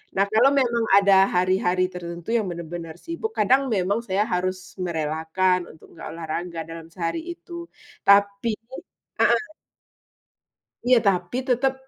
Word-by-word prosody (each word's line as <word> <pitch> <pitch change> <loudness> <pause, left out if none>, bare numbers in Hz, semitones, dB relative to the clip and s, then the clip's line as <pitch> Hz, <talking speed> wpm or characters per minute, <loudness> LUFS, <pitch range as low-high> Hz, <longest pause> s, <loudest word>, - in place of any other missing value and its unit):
Nah 195 - +3
kalau 245 +5 +6
memang 235 -2 +1
ada 200 0 +5 0.2
hari-hari 185 0 +2
tertentu 170 +1 -7
yang 215 - -1
bener-bener 170 -1 -6
sibuk, 340 +7 -4
kadang 260 +7 +4
saya 200 -5 +1
memang 200 +4 +1 0.3
harus 185 +1 0 0.3
merelakan 160 +3 0
untuk 160 - -17
nggak - - -9
olahraga 165 +1 -5
dalam 165 0 -8
sehari 170 - -2
itu 345 0 -15 0.5
tapi 200 +2 +4 0.7
heeh. 425 - +3 1.4
Iya, 250 -1 +6
tapi 180 +4 +1
tetep 260 +1 +1
185 Hz, 125 wpm, -24 LUFS, 170-230 Hz, 1.4 s, kalau